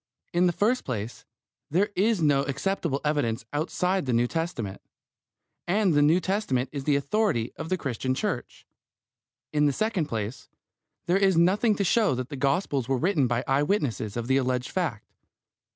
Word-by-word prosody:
In 175 +1 +4
the - - +3
first 225 +8 +1
place, 115 -2 -5 0.4
there 190 +7 +2
is 205 -2 +2
no 145 -2 +4
acceptable 155 -1 -1
evidence 120 -7 0
outside 180 +3 0
the 125 - +1
New 120 +1 +3
Testament, 160 - -3 0.9
and 195 0 +2
the 145 - +4
New 155 +5 +5
Testament 180 -9 -1
is 140 -2 -5
the 145 - +3
authority 140 - 0
of 160 - -6
the 185 - +1
Christian 130 -3 -2
Church. - - -4 0.9
In 150 0 +3
the - - +3
second 215 - -1
place, 110 0 -5 0.6
there 180 +2 +2
is 195 -3 +3
nothing 200 +6 +3
to 200 - 0
show 205 - +3
that 130 +1 -4
the 145 - -5
Gospels 140 -2 0
were 135 - +2
written 160 -3 +2
by 120 0 0
eye 135 +1 +2
witnesses 130 - -1
of 120 - -2
the 130 +2 +2
alleged 125 -1 0
fact. 160 - -2
145 Hz, 170 wpm, -26 LUFS, 130-185 Hz, 0.9 s, New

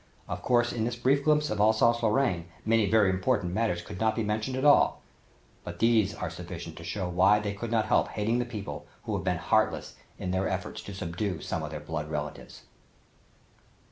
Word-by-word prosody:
Of - - -4
course 120 -1 +2
in 115 - -1
this 115 +1 -1
brief 135 +4 +2
glimpse 150 0 +2
of 110 - -2
Alsace 110 +2 +4
Lorraine 105 -7 +1 0.2
many 110 -2 +3
very 105 -3 +4
important 95 -1 0
matters 105 -5 0
could 90 - -8
not 110 0 +2
be 115 - -1
mentioned 110 +5 -2
at 130 - -1
all, 145 - +5 0.6
but 85 0 -7
these 110 -1 +3
are 80 - -4
sufficient 85 -1 -8
to 80 - -9
show 90 +2 -3
why 95 +4 +4
they 105 -1 -2
could 110 +3 -5
not 110 -1 +1
help - - +2
hating 110 +3 -1
the 120 - 0
people 100 -11 -7 0.2
who - - -4
have - - -2
been - - 0
heartless - - +1 0.2
in 90 - -3
their 95 +1 0
effort - - -4
to 100 - -7
subdue 90 0 -3
some - - -3
of - - -4
their - - -6
blood 75 -2 -5
relatives. 75 -1 -6
105 Hz, 205 wpm, -28 LUFS, 90-115 Hz, 0.6 s, all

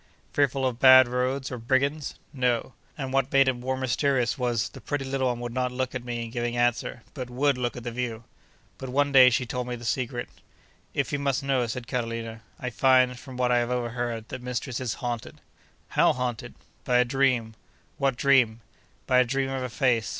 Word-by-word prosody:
—Fearful 135 -2 +1
of 125 -2 -1
bad 130 -1 +8
roads, 130 +2 -1
or 125 - -5
brigands?—No. 130 -1 -1 0.2
And 135 -3 -4
what 135 0 +1
made 135 -1 +5
it 130 - +3
more 130 +2 -3
mysterious 130 -1 +1
was, 120 -4 -1
the - - -12
pretty 145 -2 -3
little 135 -1 0
one 120 -1 -1
would 120 -1 -5
not 125 0 -1
look 130 0 -2
at 125 -2 -4
me 120 -1 -4
in 115 - -9
giving 120 0 -2
answer, 120 0 0
but 130 -3 -6
would 140 +3 +1
look 125 -1 -3
at 120 - -7
the 120 - -4
view. 115 -2 -4 0.6
But, 130 - -6
one 145 +2 +1
day 130 -2 +8
she 125 +1 0
told 125 +1 -4
me 125 - -3
the 120 0 -9
secret. 120 +1 -2 0.7
'If 140 +1 -1
you 145 - 0
must 140 -1 0
know,' 135 -3 +1
said 120 +1 -5
Carolina, 115 -2 -4 0.2
'I 125 - -3
find, 130 0 +3
from 130 -1 -10
what 125 -1 +1
I 120 - +4
have 120 0 -1
overheard, 120 -2 -3
that - - -6
mistress 125 0 -3
is 120 -4 -2
haunted.' 120 -2 -4 0.5
'How - - +4
haunted?' 125 -2 -4 0.3
'By 125 - +2
a 125 - +4
dream.' 125 -3 +1 0.5
'What 135 -3 +1
dream?' 125 -5 +3 0.4
'By 125 - +4
a - - +6
dream 135 +2 -1
of 135 -1 -2
a 125 - -3
face. 120 -4 +1
125 Hz, 205 wpm, -26 LUFS, 120-135 Hz, 0.7 s, bad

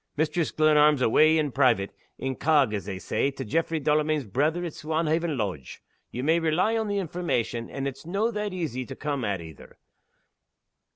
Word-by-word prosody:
Mistress 160 +2 0
Glenarm's 150 -3 +4
awa' 155 +7 +5
in 150 -3 0
private 120 -7 +2 0.3
incog, 135 -2 +2
as 100 -2 -3
they 95 -2 -5
say 135 - -1
to 135 -1 -7
Jaffray 160 +7 0
Delamayn's 150 0 +1
brither 150 - 0
at 165 - -5
Swanhaven 160 0 -1
Lodge. 95 - -4 0.3
Ye 125 - -5
may 160 +4 +3
rely 170 +7 +1
on 220 -1 -1
the 205 0 -1
information, 160 - -2
and 135 0 -4
it's 135 -1 -7
no' 200 +7 -1
that 210 -1 -3
easy 155 -9 -3
to - - -9
come 145 -4 -3
at 100 -4 -2
either. 80 -3 -13
150 Hz, 170 wpm, -26 LUFS, 125-165 Hz, 0.3 s, awa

